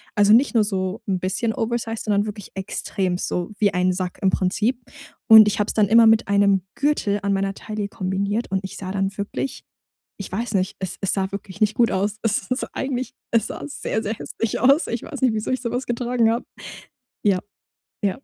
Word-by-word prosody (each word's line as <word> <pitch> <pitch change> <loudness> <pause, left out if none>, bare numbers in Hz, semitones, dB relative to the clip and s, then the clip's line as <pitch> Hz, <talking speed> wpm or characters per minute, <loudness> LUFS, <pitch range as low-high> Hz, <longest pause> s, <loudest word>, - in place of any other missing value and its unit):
Also, 205 -1 +4
nicht 250 +2 +4
nur 220 - +5
so 190 0 -2
'n 190 -2 0
bisschen 195 +5 -1
oversized, 225 -1 -2
sondern 205 -1 +2
wirklich 210 -2 -7
extrem, 190 -1 -2
so 180 +2 -3
wie 205 -2 +3
ein 180 0 +2
Sack 180 -1 -4
im 195 - +3
Prinzip. 210 +7 0 0.5
Und 220 -2 +10
ich - - -3
habe 210 - +1
es - - 0
dann 210 -2 +3
immer 230 +1 +7
mit 220 +1 +4
einem 200 -1 +4
Gürtel 280 -9 +1
an 200 - +1
meiner 195 0 0
Taille 210 0 -5
kombiniert 200 +2 -2
und 190 - +1
ich 190 - -7
sah 185 -1 -6
dann 195 0 -1
wirklich 240 +6 -4 0.5
ich 200 - -7
weiß 225 +3 -3
nicht, 190 0 0
es 190 -1 -4
es 195 - +1
sah 190 -1 -1
wirklich 200 0 -8
nicht 215 0 +3
gut 235 -1 +3
aus. 200 +2 -1
Es 210 -2 -1
ist 255 - 0
eigentlich 260 -1 -3 0.2
es 230 -2 +2
sah - - -7
sehr, 225 -5 -3
sehr 215 - -2
hässlich 225 0 -3
aus. 275 +6 +4
Ich 235 - -3
weiß 285 -5 -7
nicht, 255 -3 +3
wieso 215 -1 -3
ich 255 0 -1
so 235 - -3
was 250 +1 -2
getragen 240 -1 +1
habe. 235 +2 -1 0.8
Ja, 195 -3 +3 0.6
ja. 200 -2 0
210 Hz, 210 wpm, -22 LUFS, 195-230 Hz, 0.8 s, Und